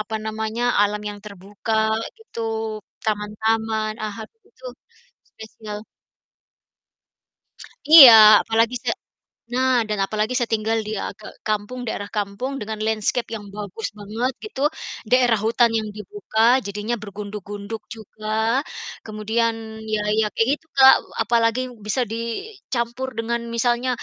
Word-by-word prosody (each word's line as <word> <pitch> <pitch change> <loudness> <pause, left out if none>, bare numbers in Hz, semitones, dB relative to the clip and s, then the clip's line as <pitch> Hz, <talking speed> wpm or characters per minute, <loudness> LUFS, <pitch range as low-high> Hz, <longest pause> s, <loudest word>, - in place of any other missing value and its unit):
apa 220 +1 -3
namanya, 220 +1 -3 0.2
alam 210 0 0
yang 205 0 -7
terbuka 205 +2 -5 0.4
gitu, 445 - -9 0.6
taman-taman, 220 +1 -1
ah, 210 -1 -3
ad - - -18 0.2
itu - - -12 0.6
spesial. 215 -1 -9 2.1
Iya, 290 -7 +12 0.3
apalagi 225 +2 +1
saya - - 0 0.6
nah 255 -2 +2
dan 210 -1 -1
apalagi 215 +4 -2
saya 240 -2 0
tinggal 220 +1 0
di - - -4
a - - -3
ke 215 - -13 0.2
kampung, 215 +4 -2
daerah 205 -2 -4
kampung, 205 +6 -2
dengan 215 0 -5
landscape 220 +2 0
yang 205 -2 -8
bagus 210 +1 -5
banget 225 +6 -2
gitu. 425 -11 -6 0.5
Daerah 245 -3 +4
hutan 235 +1 +3
yang 215 -1 -2
dibuka, 240 - +1
jadinya 210 +4 -3
bergunduk-gunduk 205 +1 -7
juga. 215 0 -11 0.8
Kemudian 220 +2 0 0.4
ya 210 - +1 0.2
ya 220 - +3
kayak 225 - +1
gitu, - - -33
Kak, 265 -1 +9
e - - -17
apalagi 230 +1 +2 0.2
bisa 215 +5 0
dicampur 235 - -4
dengan 235 +1 -1 0.2
misalnya, 240 +2 +1
220 Hz, 125 wpm, -22 LUFS, 210-235 Hz, 2.1 s, Iya